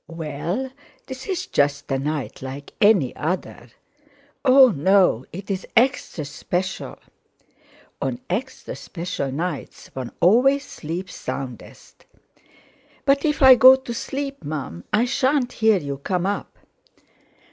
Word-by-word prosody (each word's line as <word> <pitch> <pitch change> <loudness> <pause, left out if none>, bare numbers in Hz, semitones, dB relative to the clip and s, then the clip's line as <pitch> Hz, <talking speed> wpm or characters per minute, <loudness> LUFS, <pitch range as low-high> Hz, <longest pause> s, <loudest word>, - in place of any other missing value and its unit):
"Well, 165 - -4 0.3
this 260 0 -8
is 370 -2 -2
just 145 0 0
a 135 - +1
night 150 0 -4
like 135 +2 -8
any 200 - +4
other." 175 +5 -4 0.8
"Oh! 265 -1 +7
no—it's 190 - +1
extra 240 - +1
special." 180 +5 -4 1.0
"On 130 -3 -2
extra 250 +9 -4
special 165 -6 -5
nights 155 +1 -5
one 130 -3 -5
always 260 +9 +4
sleeps 175 +4 -6
soundest." 130 -3 -8 1.0
"But 280 +1 +3
if 295 -2 +1
I 265 -1 +11
go 260 +1 +9
to 260 -2 -7
sleep, 275 +3 -5
Mum, 135 - -5
I 215 +3 +3
shan't 260 0 +1
hear 220 -2 +3
you 140 -5 -4
come 180 +4 -1
up." 200 +1 -3
185 Hz, 115 wpm, -22 LUFS, -, 1.0 s, I